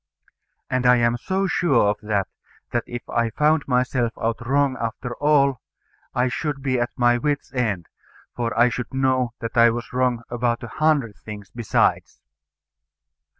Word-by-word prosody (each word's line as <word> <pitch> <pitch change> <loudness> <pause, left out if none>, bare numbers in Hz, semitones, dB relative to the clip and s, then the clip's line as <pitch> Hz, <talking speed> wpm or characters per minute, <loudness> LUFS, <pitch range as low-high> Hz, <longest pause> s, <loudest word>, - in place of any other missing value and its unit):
And 130 -1 0
I 125 - +7
am 120 0 +2
so 190 +10 -1
sure 140 - +2
of 105 - -4
that, 105 -2 -1 0.4
that 120 - 0
if 120 0 -7
I 115 -1 0
found 150 +4 +1
myself 125 -2 +1
out 115 +1 -2
wrong 140 0 +2
after 120 +2 -4
all 140 -3 +3 0.5
I 125 +1 +2
should 140 +3 -3
be 130 -3 +1
at 120 +1 0
my 120 -1 +3
wit's 145 +2 -2
end; 105 -9 -1 0.5
for 120 -1 -2
I 120 +1 +6
should 125 +1 -5
know 130 -3 +1
that 115 0 -5
I 115 0 +7
was 120 +2 -5
wrong 125 -2 +1
about 120 0 -1
a 120 - -6
hundred 145 -6 +1
things 105 -2 -10
besides. 120 -3 0
125 Hz, 160 wpm, -23 LUFS, 115-135 Hz, 0.5 s, I